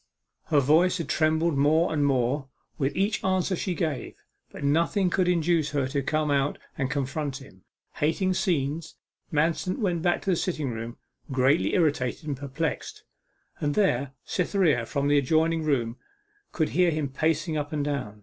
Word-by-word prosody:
Her 150 -3 +3
voice 160 +7 +4
had 165 - -4
trembled 160 0 +2
more 160 +4 +3
and 150 -2 +1
more 135 0 +1 0.3
at 135 +1 0
each 200 +3 0
answer 185 0 +1
she 180 +1 -2
gave, 155 -4 -3 0.4
but - - -9
nothing 170 +6 +2
could 185 0 +2
induce 170 -3 +2
her 140 -3 +1
to 140 +1 -1
come 155 +2 0
out 140 0 +1 0.2
and 135 -2 -1
confront 140 0 -2
him. 115 -10 -15 0.3
Hating 185 +5 +1
scenes, 160 -4 -1 0.4
Manston 165 +4 0
went 180 -8 0
back 175 +1 +1
to 195 - +1
the - - +3
sitting 155 -6 -2
room, 115 +1 -6 0.3
greatly 135 +4 +2
irritated 150 -4 0
and 145 - -1
perplexed. 140 +4 -4 0.6
And 145 -1 -1
there 140 -10 +1
Cytherea 170 - +1
from 140 0 -1
the 145 0 +4
adjoining 160 +4 +2
room 125 -6 0 0.5
could 155 -3 0
hear 180 +1 +3
him 155 -3 -1
pacing 160 +3 0
up 145 -1 -3
and 150 -2 -1
down. 125 -8 -3
155 Hz, 165 wpm, -26 LUFS, 140-170 Hz, 0.6 s, voice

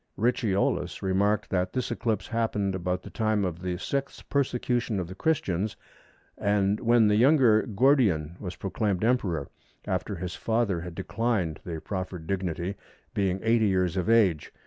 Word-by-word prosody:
Ricciolus 100 -6 0
remarked 100 +3 +1
that 90 -1 0
this 125 -2 -2
eclipse 115 -3 -2
happened 110 -4 0
about 90 0 -2
the - - -10
time 110 -3 +1
of 85 -1 -4
the 90 -1 -2
Sixth 140 +8 -4
Persecution 125 -5 0
of 90 - -3
the 95 - -8
Christians, 100 - 0 0.6
and 100 0 +2
when 115 -2 +4
the 105 0 +3
younger 125 -3 +5
Gordian 105 - +2
was 90 -3 -6
proclaimed 100 0 -1
Emperor, 110 -9 +1 0.4
after - - -2
his 90 -1 -5
father 110 -6 0
had 90 -1 -7
declined 105 -10 -1
the 80 -2 -5
proffered 95 -2 -5
dignity, 90 0 -2 0.4
being 95 -2 0
80 110 -1 +3
years 90 -2 +1
of 95 +2 -1
age. 100 -9 +3
100 Hz, 150 wpm, -27 LUFS, 90-115 Hz, 0.6 s, younger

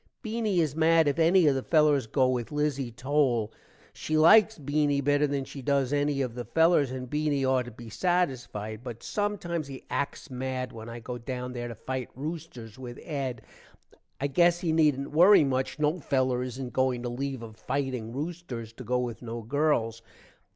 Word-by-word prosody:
Beany 220 -4 0
is 155 -4 +1
mad 160 0 +4
if 145 +3 0
enny 170 +2 +5
of 145 - +5
the 135 - -1
fellers 150 -5 +3
go 130 +3 +2
with 125 -1 -2
Lizzie 150 -4 -1
Towle. 125 -3 0 0.4
she 155 - -2
likes 215 +7 +6
Beany 145 -1 +1
better 145 +1 +2
than 140 -1 -2
she 135 - -9
does 140 0 +1
enny 145 -1 +1
of 125 -3 -4
the 120 0 -5
fellers 160 -1 +3
and 130 0 -5
Beany 150 0 0
ought 130 -1 +2
to 120 - -8
be 120 +1 -11
satisfied, 120 - -1
but 120 -3 -8
sometimes 180 -7 -2
he 135 -1 -9
acks 140 +1 -3
mad 130 0 -3
when 115 0 -8
i 115 +1 -7
go 120 +1 -6
down 125 +1 -5
there 120 -1 -4
to 115 - -7
fite 130 +3 -4
roosters 135 -6 -7
with 125 -2 -8
Ed. 135 -6 -4 0.8
i 140 - -1
gess 175 +4 +3
he 170 - 0
needent 150 -4 +2
worry 175 +4 +7
much, 130 -1 -1
no 150 +3 +1
feller 130 -4 0
isnt 130 0 -6
going 130 -2 +1
to 120 - -2
leave 135 0 -4
of 110 -1 -10
fiting 130 -2 -3
roosters 135 -6 -5
to 125 - -10
go 125 +2 0
with 120 -3 -3
no 115 -1 -6
girls. 115 -3 0
135 Hz, 185 wpm, -28 LUFS, 125-155 Hz, 0.8 s, worry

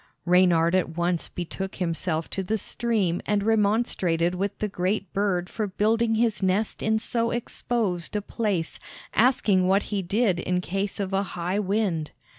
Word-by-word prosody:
Reynard 175 -2 +4
at 175 -3 0
once 175 0 0
betook 190 +2 -5
himself 165 -2 -2
to 195 - -2
the 210 +4 -1
stream 210 -5 -1
and 205 -1 +1
remonstrated 200 -6 +2
with 195 +2 -2
the 210 - -1
great 190 0 -2
bird 190 -3 0
for 215 +2 -3
building 225 +3 +1
his 225 -2 +1
nest 195 +3 0
in 220 0 +2
so 230 +1 0
exposed 225 -6 -2
a 210 - +1
place, 200 -8 -2 0.3
asking 210 -6 +3
what 195 +2 +3
he 200 - +1
did 195 0 +1
in 180 +1 0
case 195 +3 -3
of 195 -1 -2
a 195 - +2 0.2
high 180 +4 -1
wind. 195 -6 0
195 Hz, 160 wpm, -25 LUFS, 180-215 Hz, 0.3 s, Reynard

